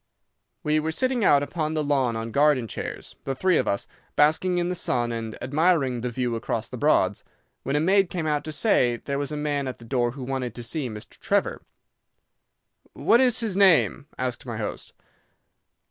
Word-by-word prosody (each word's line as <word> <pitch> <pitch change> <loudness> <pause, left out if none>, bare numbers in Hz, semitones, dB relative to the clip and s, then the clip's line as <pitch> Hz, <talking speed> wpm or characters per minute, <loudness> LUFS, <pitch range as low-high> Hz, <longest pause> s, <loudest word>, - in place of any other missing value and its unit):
"We 150 0 +2
were 160 +1 -2
sitting 255 +6 0
out 145 -6 +5
upon 155 +1 -2
the 155 - 0
lawn 135 -5 +1
on 115 +1 -4
garden 140 -3 +3
chairs, - - -6
the 135 - -3
three 185 +4 +2
of - - 0
us, 100 - 0 0.3
basking 160 +5 +3
in 175 0 0
the 180 - -1
sun 120 -9 -1
and 115 -1 -5
admiring 140 -3 +1
the 125 - -2
view 120 -1 -2
across 115 0 -3
the - - -8
Broads, 110 -8 +2 0.4
when 135 - -2
a - - +3
maid 190 +3 +3
came 170 -3 -3
out 150 -1 0
to 155 - -5
say 150 - +2
that - - -14
there 140 0 -2
was 145 +1 -2
a 150 - -3
man 145 -2 -1
at 130 - -5
the 115 - -14
door 120 -1 0
who 135 -1 -7
wanted 125 -3 -3
to 120 - -6
see 130 +2 -3
Mr. 105 -1 -10
Trevor. - - 0 1.3
"'What 235 +3 +3
is 250 -2 +3
his 220 -5 -1
name?' 190 -6 +4
asked 125 -2 -3
my 115 -3 -5
host. 110 - -5
140 Hz, 200 wpm, -25 LUFS, 120-160 Hz, 1.3 s, out